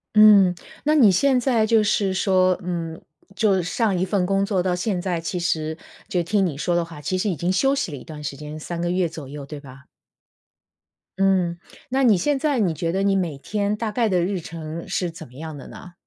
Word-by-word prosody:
嗯， 205 -4 +7 0.3
那 305 +1 +3
你 230 -9 +7
现 255 +7 +3
在 240 -4 +2
就 220 -1 +4
是 200 -2 +1
说， 185 -1 +2
嗯， 165 -2 -4 0.4
就 195 -3 +2
上 195 +2 0
一 - - +1
份 190 -1 0
工 195 +1 +1
作 190 -3 0
到 180 -1 +1
现 180 +1 -1
在 175 -3 -2
其 175 +3 -3
实 160 -2 -1 0.3
就 175 -2 0
听 195 +2 +1
你 150 -5 -3
说 175 +3 0
的 175 - +2
话， 165 -2 -10
其 185 +6 -1
实 205 +2 0
已 175 - -1
经 175 +5 -1
休 270 +8 +2
息 180 - -2
了 140 - -6
一 - - -11
段 150 -2 -9
时 140 -1 -4
间， 150 +2 -8
3 170 +2 -5
个 175 - -1
月 180 -1 +1
左 155 -3 -9
右 140 0 -8
对 150 +1 -8
吧？ 135 -1 -14 1.3
嗯， 185 -3 +2 0.3
那 265 +2 +1
你 230 -5 +6
现 285 +10 +1
在 285 -2 0
你 180 -7 +1
觉 165 +1 -2
得 190 +2 -1
你 195 0 +2
每 170 -7 -2
天 205 +5 -1
大 215 0 -3
概 230 0 +1
的 185 -3 +2
日 190 0 -1
程 165 0 -7
是 180 - -1
怎 165 -1 -10
么 125 - -20
样 155 +2 -7
的 - - -10
呢？ 180 - -12
180 Hz, 245 characters per minute, -23 LUFS, 165-205 Hz, 1.3 s, 嗯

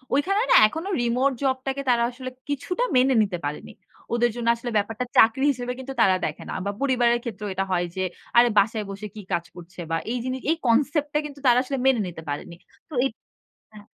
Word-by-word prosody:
ওইখানে 390 +9 +2
না - - +7
এখনো 320 - -5
রিমোট 250 +3 +2
জব 260 -1 +2
টাকে 270 +1 -1
তারা 235 -1 +3
আসলে 255 +1 -7 0.2
কিছুটা 325 - -2
মেনে 255 0 +4
নিতে 190 -4 -3
পারেনি। 145 +1 -5 0.4
ওদের 240 0 +3
জন্য 235 -1 -4
আসলে 240 +1 -6
ব্যাপারটা 225 +4 -1
চাকরি 230 +5 +5
হিসেবে 245 -2 -4
কিন্তু 270 +1 -6
তারা 190 -1 +5
দেখে - - -5
না। - - -4
বা 200 - 0
পরিবারের 245 -3 +2
ক্ষেত্রেও 210 -3 -5
এটা 195 +1 -1
হয় 175 -1 +1
যে, 190 - -2 0.4
আরে 240 0 +7
বাসায় 210 +1 +2
বসে 200 +2 -6
কি 210 - -7
কাজ 170 0 0
করছে 175 0 -13
বা - - +2 0.2
এই 250 - -1
জিনিস 255 0 -2
এই - - +3
concept 285 +5 +2
টা 300 - +2
কিন্তু 285 -1 -9
তারা 245 -1 +6
আসলে 275 +1 -3
মেনে 255 -5 +4
নিতে 170 -2 -8
পারেনি। 145 +4 -5 0.3
তো - - -12
এই 270 - +2 0.6
হ্যাঁ। 210 -1 -13
240 Hz, 210 wpm, -24 LUFS, 205-270 Hz, 0.6 s, না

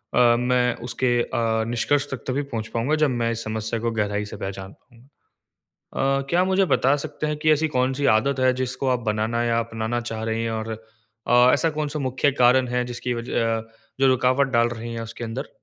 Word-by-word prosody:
अ, - - +4 0.2
मैं 125 -1 +1
उसके 120 -1 +1
अ, 115 -1 0
निष्कर्ष 140 +5 0
तक 130 -4 -5
तभी 135 +2 0
पहुँच 110 -1 -3
पाऊँगा 125 +7 +1
जब 145 - +1
मैं 120 -2 0
इस 115 0 -3
समस्या 110 +1 -3
को 115 +1 -1
गहराई 105 -1 -1
से 105 0 -8
पहचान 95 0 -6
पाऊँगा। 125 +2 -25 0.9
अ, 135 - -7
क्या 175 +1 +3
आप 185 - +2
मुझे 190 +1 +3
बता 135 -6 +3
सकते 150 0 -4
हैं 150 - -1
कि 155 +1 +3
ऐसी 155 +1 +1
कौन-सी 130 0 0
आदत 135 +4 0
है 130 0 +4
जिसको 130 +1 -2
आप 125 -1 +1
बनाना 110 +2 -1
या 115 -1 +1
अपनाना 115 +1 -3
चाह 115 -2 -5
रही 115 0 -1
हैं? 115 - -1
और 110 0 -4 0.6
अ, 125 +1 +5
ऐसा 165 - +2
कौन-सा 150 0 -3
मुख्य 130 +1 +1
कारण 125 +1 +5
है 125 0 0
जिसकी 120 0 -4
वजह 115 -1 -1
अ, 110 - -6 0.4
जो 135 - +5
रुकावट 130 +2 +3
डाल 120 0 +3
रही 115 0 -6
है 115 - -4
उसके 115 +1 -7
अंदर? 120 +5 -5
120 Hz, 210 wpm, -23 LUFS, 115-135 Hz, 0.9 s, अ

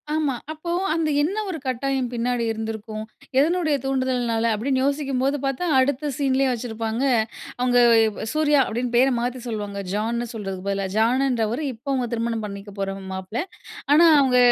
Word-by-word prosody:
ஆமா. 295 -4 0 0.2
அப்போ 315 +2 -5 0.2
அந்த, 320 -2 0
"என்ன 375 +8 0
ஒரு 345 - -3
கட்டாயம் 260 0 -1
பின்னாடி 240 0 0
இருந்திருக்கும்? 220 -1 -5 0.4
எதனுடைய 315 0 +2
தூண்டுதல்னால?" 250 -4 0
அப்படீன்னு 260 +4 0
யோசிக்கும்போது 275 -1 0
பார்த்தா, 275 +6 -1
அடுத்த 285 +2 +1
சீன்லயே 270 -1 +2
வச்சிருப்பாங்க. 225 0 -3 0.6
அவுங்க 245 0 +3 0.5
சூர்யா 300 -2 +3
அப்படீன்னு 240 +2 -3
பேர 265 +2 +5
மாத்தி 250 +1 -2
சொல்வாங்க, 205 -3 -4
ஜான்னு 235 +3 -1
சொல்றதுக்கு 195 -3 -5
பதிலா. 195 -1 -1
ஜான்னுன்றவரு 240 +1 +1
இப்ப 230 +4 -19
அவுங்க 255 -2 0
திருமணம் 230 -1 -1
பண்ணிக்க 200 0 -8
போற 195 0 -1 0.2
மாப்பிளை. 190 - -3 0.5
ஆனா, 335 +3 +7
அவுங்க 260 -2 +3
250 Hz, 140 wpm, -23 LUFS, 225-275 Hz, 0.6 s, ஆனா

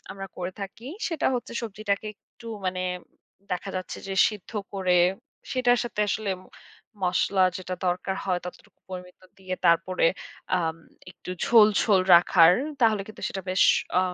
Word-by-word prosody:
আমরা 195 0 -7
করে 180 +1 -4
থাকি 200 +5 -8 0.2
সেটা 330 -3 -1
হচ্ছে 240 0 -4
সবজিটাকে 210 -1 -3
একটু 230 - -18 0.2
মানে 185 0 -1 0.7
দেখা 185 +2 -3
যাচ্ছে 185 - -5
যে 195 - -3
সিদ্ধ 210 -4 -9 0.2
করে, 185 -2 +1 0.6
সেটার 245 -2 +3
সাথে 230 -3 -4
আসলে 205 -1 -1
ম - - -18 0.6
মসলা 185 +2 +2
যেটা 185 0 -5
দরকার 180 +2 -1
হয় 185 -2 0
ততটুকু 180 - -11
পরিমিত 180 -1 -9 0.2
দিয়ে 185 -1 -4
তারপরে 170 +1 +3 0.5
আম 165 -2 -1 0.3
একটু 180 - -10
ঝোল, 220 -2 +7
ঝোল 200 -3 +4
রাখার। 170 0 +7 0.3
তাহলে 215 -3 +3
কিন্তু 215 - -12
সেটা 195 - -5
বেশ 185 - +3 0.4
আ - - +5
190 Hz, 150 wpm, -26 LUFS, 180-215 Hz, 0.7 s, ঝোল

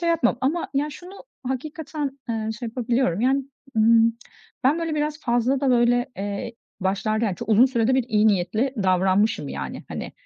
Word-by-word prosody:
şey 340 - 0
yapmam 250 -7 +2
ama 300 +6 0
ya 290 +2 0
şunu 365 +8 -11 0.2
hakikaten, 290 +1 -4
eee, 220 -1 -2
şey 240 - -5
yapabiliyorum 235 -4 0
yani, 265 +2 +2 0.3
ımm, 230 +1 +5 0.5
ben 295 +5 +4
böyle 330 -2 -2
biraz 300 +1 -2
fazla 245 +3 +1
da, 270 -2 +2
böyle, 245 +1 +3
eee, 200 +4 -4 0.3
başlarda 215 +4 0
yani 195 -4 -1
çok - - -7
uzun 225 +4 +6
sürede 250 0 +1
bir 260 - +2
iyi 215 -1 +3
niyetli 215 +7 +1
davranmışım 190 +3 +2
yani, - - -6
hani, - - -6
245 Hz, 170 wpm, -24 LUFS, 220-275 Hz, 0.5 s, uzun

